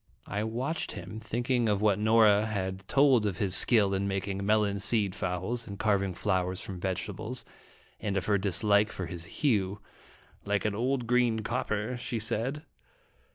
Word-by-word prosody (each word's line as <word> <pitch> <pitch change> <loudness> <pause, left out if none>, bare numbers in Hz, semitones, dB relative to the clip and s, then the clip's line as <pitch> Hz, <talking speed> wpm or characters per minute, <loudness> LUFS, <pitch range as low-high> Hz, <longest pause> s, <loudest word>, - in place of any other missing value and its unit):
I 105 +2 -2
watched 125 +9 -3
him, 90 +5 -7
thinking 120 +1 0
of 100 -1 +1
what 105 -1 +2
Nora 110 -1 +4
had 95 -2 -4
told 135 -6 +4
of 95 -4 -3
his 95 -2 0
skill 105 -4 +4
in 95 +1 0
making 95 0 -2
melon 105 -1 +2
seed 100 -1 +1
fowls, 95 +5 -3
and 100 -1 -7
carving 100 -3 +1
flowers 95 -1 0
from 95 -2 -6
vegetables, 105 +6 -3 0.5
and 100 -2 -2
of 95 - -1
her 100 -2 +2
dislike 100 +2 +2
for 95 - -5
his 85 0 -6
hue 105 - 0 0.6
'Mike 100 +1 -1
an 105 - +1
old, 125 +3 -1
green 120 -2 +2
copper," 110 0 -2
she 120 0 -4
said. 115 +7 -1
105 Hz, 160 wpm, -29 LUFS, 95-115 Hz, 0.6 s, Nora